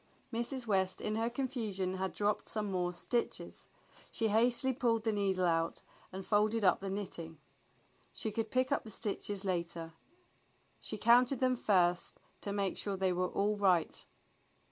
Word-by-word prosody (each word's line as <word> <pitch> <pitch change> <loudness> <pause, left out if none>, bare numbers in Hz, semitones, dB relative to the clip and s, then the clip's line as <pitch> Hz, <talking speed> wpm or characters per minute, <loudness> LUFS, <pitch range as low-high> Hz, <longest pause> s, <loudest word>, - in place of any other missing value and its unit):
Mrs. 240 +2 -3
West 190 -3 +1
in 215 - -2
her 225 +1 0
confusion 230 -8 -2
had 190 0 -2
dropped 210 0 0
some 210 -2 -1
more 180 -1 0
stitches. 230 +7 -3 0.4
She 225 -1 0
hastily 240 +4 +4
pulled 230 -3 +1
the 225 - +1
needle 195 -3 0
out 165 -1 0 0.3
and 190 0 -7
folded 215 +1 +2
up 185 -2 +4
the 195 - -5
knitting. 175 -5 -5 0.7
She 220 - -3
could 220 +1 -2
pick 255 +3 +1
up 280 - +1
the 220 - -10
stitches 205 -1 +1
later. 170 -3 -2 0.9
She 215 - -5
counted 245 +4 +4
them 255 -1 +2
first 180 -6 +1 0.2
to 200 - -3
make 200 -2 -1
sure 200 -2 -1
they 190 -1 +1
were 180 0 0
all 210 +1 0
right. 185 -5 +2
205 Hz, 160 wpm, -33 LUFS, 185-230 Hz, 0.9 s, hastily